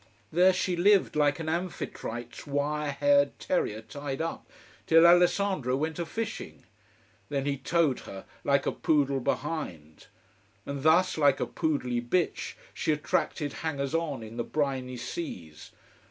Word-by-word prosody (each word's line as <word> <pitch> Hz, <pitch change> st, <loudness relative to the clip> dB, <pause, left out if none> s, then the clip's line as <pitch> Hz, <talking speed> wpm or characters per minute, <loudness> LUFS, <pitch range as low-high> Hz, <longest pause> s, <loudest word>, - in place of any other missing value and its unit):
There 180 Hz, +3 st, +5 dB
she 185 Hz, -1 st, -1 dB
lived, 195 Hz, +1 st, +4 dB
like 145 Hz, -1 st, +3 dB
an 160 Hz, -, -5 dB
Amphitrite's 120 Hz, -9 st, -4 dB
wire 145 Hz, +1 st, -1 dB
haired 285 Hz, -, +3 dB
terrier 115 Hz, -, -1 dB
tied 140 Hz, +2 st, -6 dB
up, 165 Hz, +1 st, -4 dB, 0.4 s
till 165 Hz, +1 st, +7 dB
Alessandro 175 Hz, -5 st, +4 dB
went 155 Hz, +3 st, -2 dB
a 170 Hz, -, -2 dB
fishing. 225 Hz, +5 st, -5 dB, 0.7 s
Then 140 Hz, -2 st, -1 dB
he 140 Hz, -1 st, 0 dB
towed 155 Hz, -1 st, +1 dB
her, 95 Hz, -, -9 dB, 0.2 s
like 140 Hz, -1 st, +2 dB
a -, -, +1 dB
poodle 140 Hz, -3 st, +1 dB
behind. 105 Hz, -, -4 dB, 0.6 s
And 140 Hz, -1 st, -4 dB
thus, 160 Hz, +3 st, +4 dB
like 140 Hz, -2 st, +4 dB
a -, -, 0 dB
poodly 125 Hz, -6 st, -1 dB
bitch, 165 Hz, +9 st, -1 dB, 0.2 s
she -, -, 0 dB
attracted 150 Hz, -1 st, -1 dB
hangers 140 Hz, -4 st, -2 dB
on 155 Hz, -7 st, -1 dB
in 110 Hz, +2 st, -9 dB
the 120 Hz, -, 0 dB
briny 130 Hz, -3 st, -2 dB
seas. 115 Hz, -, -7 dB
145 Hz, 140 wpm, -28 LUFS, 135-170 Hz, 0.7 s, till